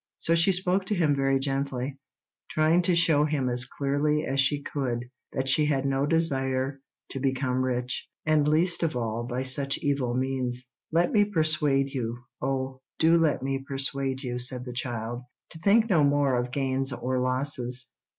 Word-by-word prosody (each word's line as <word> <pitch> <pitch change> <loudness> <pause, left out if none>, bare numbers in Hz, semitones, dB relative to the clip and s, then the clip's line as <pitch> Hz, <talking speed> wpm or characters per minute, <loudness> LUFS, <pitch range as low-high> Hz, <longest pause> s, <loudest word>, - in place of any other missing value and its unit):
So 165 - +1
she 170 +3 +4
spoke 185 +1 0
to 210 - 0
him 155 -5 +2
very 135 0 +2
gently, 135 -1 -2 0.5
trying 155 +3 +3
to 180 0 +2
show 165 -3 +4
him 150 -4 0
as 125 0 +1
clearly 145 +3 0
as 135 +1 -1
she 140 +2 +3
could 125 -5 -3 0.3
that 130 0 -2
she 150 +3 +4
had 135 -2 0
no 135 +1 +1
desire 135 -4 0 0.3
to 135 - -3
become 130 -1 0
rich, 125 -1 -2 0.2
and 155 -2 +3
least 170 +3 +3
of 160 -5 0
all 115 -1 -2
by 125 +1 -3
such 135 +1 +1
evil 135 -4 -1
means. 125 -1 -2 0.2
"Let 170 +2 +2
me 210 -2 +4
persuade 155 -7 +1
you—oh, 130 +2 -4 0.2
do 165 +1 +4
let 155 -5 +1
me 135 0 -1
persuade 135 -1 -2
you," 125 -1 -3
said 125 0 -1
the 125 - -6
child, 120 -1 -3 0.3
"to 160 - -10
think 215 +6 +4
no 170 -9 +3
more 140 -2 +2
of 125 0 -1
gains 135 -1 -1
or 125 +1 -2
losses. 125 -1 -1
135 Hz, 170 wpm, -27 LUFS, 130-150 Hz, 0.5 s, she